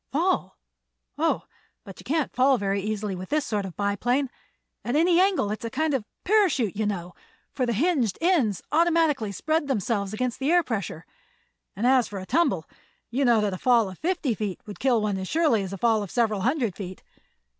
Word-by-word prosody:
"Fall? - - 0 0.6
Oh, - - +1 0.4
but 195 - -11
you - - -11
can't 305 0 -1
fall 265 +1 +4
very 200 -1 -1
easily 210 0 -3
with 185 +1 -7
this 300 -1 +1
sort 205 -3 -2
of 185 - -7
a - - -45
biplane. 245 +7 0 0.5
At 240 - -2
any 340 +3 +4
angle 370 - +2
it's 215 +3 -5
a 230 - -3
kind 310 +5 0
of 265 - +1
a - - -23 0.2
parachute, 360 - +2
you 215 0 0
know, 180 -3 -4 0.4
for 255 -3 -1
the 235 - +1
hinged 255 - +1
ends 310 - +1
automatically 320 -8 +2
spread 310 - -1
themselves 205 -5 -1
against 245 +2 -2
the 275 +4 +1
air 350 0 +5
pressure. 195 - -4 0.7
And 210 - -2
as 255 -1 +4
for 205 - -7
a 185 - -6
tumble, 220 - +1 0.4
you 265 +4 0
know 235 -4 +4
that 205 -2 0
a 185 - -5
fall 235 -6 +3
of 185 - -13
fifty 335 -7 0
feet 210 -4 -4
would 205 - -9
kill 245 -5 +2
one 205 -2 -1
as 190 - -4
surely 305 - +2
as 190 -1 -5
a 195 - -5
fall 225 0 +2
of 200 - -5
several 215 -3 0
hundred 240 - 0
feet. 185 -2 -8
235 Hz, 210 wpm, -25 LUFS, 200-290 Hz, 0.7 s, air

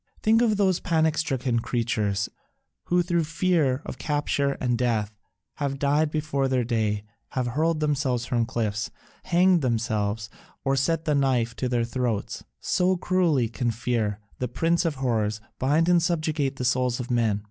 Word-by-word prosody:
Think 225 +2 +4
of 220 -4 +3
those 190 -3 +2
panic 160 -2 +1
stricken 130 -6 0
creatures 105 -4 -1 0.6
who 175 0 +2
through 170 -1 +1
fear 160 -5 +1
of - - -7
capture 145 -2 0
and 125 -3 -1
death 110 -4 0 0.4
have 140 -2 -2
died 145 +2 +2
before 150 -3 -1
their 130 -2 +1
day, 110 -3 0 0.3
have 130 -2 0
hurled 155 +5 0
themselves 135 -5 0
from 120 -2 0
cliffs, 110 -4 -2 0.4
hanged 180 0 +4
themselves, 110 -4 -1 0.4
or 135 0 +2
set 160 +4 0
the 150 - +2
knife 130 -5 +1
to 125 - -1
their 120 -1 +1
throats; 120 -3 -2 0.2
so 185 +1 +1
cruelly 170 -9 +2
can 120 +2 -2
fear, 115 -3 -1 0.2
the 125 - -1
prince 165 +8 +1
of 160 -3 0
horrors, 110 -5 0 0.2
bind 150 +6 +2
and 175 -1 +5
subjugate 155 -5 0
the 125 - -3
souls 125 0 +1
of 125 0 -4
men. 115 -4 +2
130 Hz, 160 wpm, -25 LUFS, 115-160 Hz, 0.6 s, and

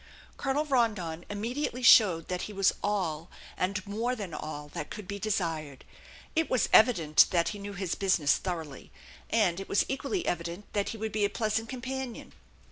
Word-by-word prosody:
Colonel 285 +2 -1
Rondon 210 - 0
immediately 245 +5 -3
showed 185 -8 +6
that 180 -1 -3
he - - -8
was 195 -1 +3
all, 175 -6 -1 0.3
and 185 +1 -2
more 225 +5 -1
than 200 -8 -6
all, 150 -1 -6
that 150 - -6
could 210 -3 -8
be 200 +1 -5
desired. 165 -9 -2 0.5
It 325 0 +1
was 255 - +2
evident 175 -10 +6
that 170 -2 +2
he 205 - -6
knew 200 0 -6
his 190 -2 -2
business 185 -7 +2
thoroughly, 160 -7 -6 0.4
and 195 -6 +2
it 195 - -7
was 200 - +3
equally 280 +7 -2
evident 170 +3 -3
that 205 -1 0
he 225 - -5
would 220 0 -3
be 210 0 0
a 205 - +3
pleasant 220 +1 -1
companion. 260 -1 -5
200 Hz, 175 wpm, -29 LUFS, 170-230 Hz, 0.5 s, showed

